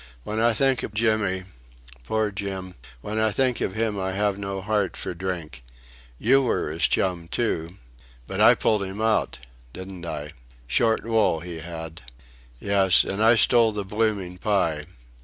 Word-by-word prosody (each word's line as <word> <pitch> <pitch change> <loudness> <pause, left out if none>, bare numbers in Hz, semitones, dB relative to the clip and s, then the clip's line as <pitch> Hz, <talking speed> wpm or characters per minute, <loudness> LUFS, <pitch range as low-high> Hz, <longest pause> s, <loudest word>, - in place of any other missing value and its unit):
"When 105 +7 -3
I 115 +1 +3
think 135 +2 +2
of 105 - -6
Jimmy... 110 -4 +1 0.6
Poor 110 - 0
Jim! 95 -2 -5 0.3
When 110 +7 -3
I 110 0 +3
think 130 +2 +1
of 95 - -2
him 110 -2 -1
I 95 0 -2
have 100 0 +1
no 100 -1 -4
heart 100 -1 -1
for - - -4
drink. 85 -7 -5 0.5
You 135 - +4
were 120 - -1
his 80 -1 +2
chum, 90 -3 0
too... 85 -5 -2 0.5
but - - -3
I - - +8
pulled 105 -2 +1
him 95 +1 -5
out... 110 -1 +1 0.4
didn't 95 -1 -8
I? 75 -2 -5 0.3
Short 110 - +2
wool 110 -8 +2
he 85 -1 -7
had.... 80 -1 -8 0.6
Yes. 95 -2 +4
And 100 +3 -2
I 115 +1 +6
stole 115 -1 +4
the 105 -1 -3
blooming 100 -3 -2
pie.... 85 -7 0
100 Hz, 160 wpm, -24 LUFS, 90-110 Hz, 0.6 s, I